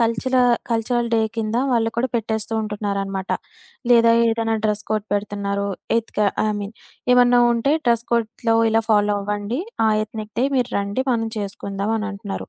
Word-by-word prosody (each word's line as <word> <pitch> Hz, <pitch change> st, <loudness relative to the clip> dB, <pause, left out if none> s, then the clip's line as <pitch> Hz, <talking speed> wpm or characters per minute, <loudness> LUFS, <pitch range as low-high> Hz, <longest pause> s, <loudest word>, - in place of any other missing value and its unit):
కల్చల 230 Hz, +3 st, +1 dB, 0.3 s
cultural 235 Hz, +1 st, 0 dB
day 225 Hz, -, +3 dB, 0.2 s
కింద 220 Hz, +1 st, -1 dB, 0.2 s
వాళ్ళు 225 Hz, -1 st, +2 dB
కూడా 255 Hz, +2 st, +1 dB
పెట్టేస్తూ 220 Hz, 0 st, -2 dB
ఉంటున్నారనమాట. 200 Hz, -2 st, -3 dB, 0.6 s
లేదా 230 Hz, -1 st, +6 dB, 0.2 s
ఏదనా 225 Hz, 0 st, 0 dB
డ్రెస్ 210 Hz, 0 st, 0 dB
కోడ్ 215 Hz, -1 st, -1 dB
పెడుతున్నారు. 200 Hz, -1 st, -2 dB, 0.3 s
ఎత్క 225 Hz, -, -7 dB, 0.3 s
ఐ -, -, +1 dB
మీన్ 205 Hz, +2 st, -6 dB, 0.4 s
"ఏమన్నా 245 Hz, 0 st, +5 dB
ఉంటే 235 Hz, +5 st, +1 dB
డ్రెస్ 235 Hz, 0 st, +2 dB
కోడ్‌లొ 230 Hz, 0 st, +1 dB
ఇలా 225 Hz, 0 st, +2 dB
ఫాలో 205 Hz, -1 st, +3 dB
అవ్వండి. 205 Hz, +6 st, -3 dB, 0.3 s
ఆ! -, -, +4 dB, 0.2 s
ఎత్నిక్ 215 Hz, -1 st, -8 dB
డే -, -, +3 dB
మీరండి 240 Hz, -1 st, -1 dB
మనం 225 Hz, -2 st, 0 dB
చేసుకుందాం" 200 Hz, +1 st, -3 dB
అని 215 Hz, 0 st, -3 dB
అంటున్నారు. 200 Hz, 0 st, -6 dB
220 Hz, 150 wpm, -21 LUFS, 205-230 Hz, 0.6 s, లేదా